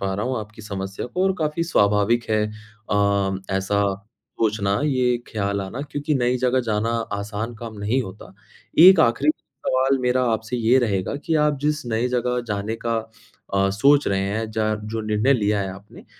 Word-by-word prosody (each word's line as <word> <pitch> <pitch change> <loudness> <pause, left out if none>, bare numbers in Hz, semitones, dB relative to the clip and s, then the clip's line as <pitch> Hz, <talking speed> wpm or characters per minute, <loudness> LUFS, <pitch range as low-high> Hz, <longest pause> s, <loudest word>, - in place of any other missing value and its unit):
पा 95 -1 -1
रहा 105 +4 -2
हूँ 130 -1 -1
आपकी 105 0 -9
समस्या 95 0 -5
को 180 +9 -2
और 190 - +3
काफ़ी 155 +1 -1
स्वाभाविक 105 -4 +2
है 110 - +3 0.5
अ, 100 -1 +2 0.2
ऐसा 100 +1 0 0.6
सोचना, 105 -1 +1
ये 125 -4 +2
ख़याल 100 -2 -2
आना 100 +8 -5
क्योंकि 145 +2 -1
नई 125 -1 +1
जगह 130 +1 +2
जाना 105 +2 0 0.3
आसान 105 +3 -4
काम 115 -1 -8
नहीं 110 +6 0
होता। 95 -2 -10 0.5
1 180 +1 +9
आख़िरी 145 +2 +3 0.4
सवाल 130 +1 +2
मेरा 125 +1 +2
आपसे 110 +2 -2
ये 120 +3 +4
रहेगा 100 -5 0
कि 165 - 0
आप 150 -2 +1
जिस 150 -1 0
नई 115 +2 0
जगह 125 0 0
जाने 105 +2 -3
का 115 - +1 0.6
अ, 100 0 +3
सोच 140 +9 +4
रहे 95 -1 +1
हैं। 110 +2 -3
ज 110 -1 0 0.2
जो 115 - -2
निर्णय 110 +4 +2
लिया 105 -5 +1
है 95 - -3
आपने, 100 +2 -14
110 Hz, 180 wpm, -22 LUFS, 100-130 Hz, 0.6 s, 1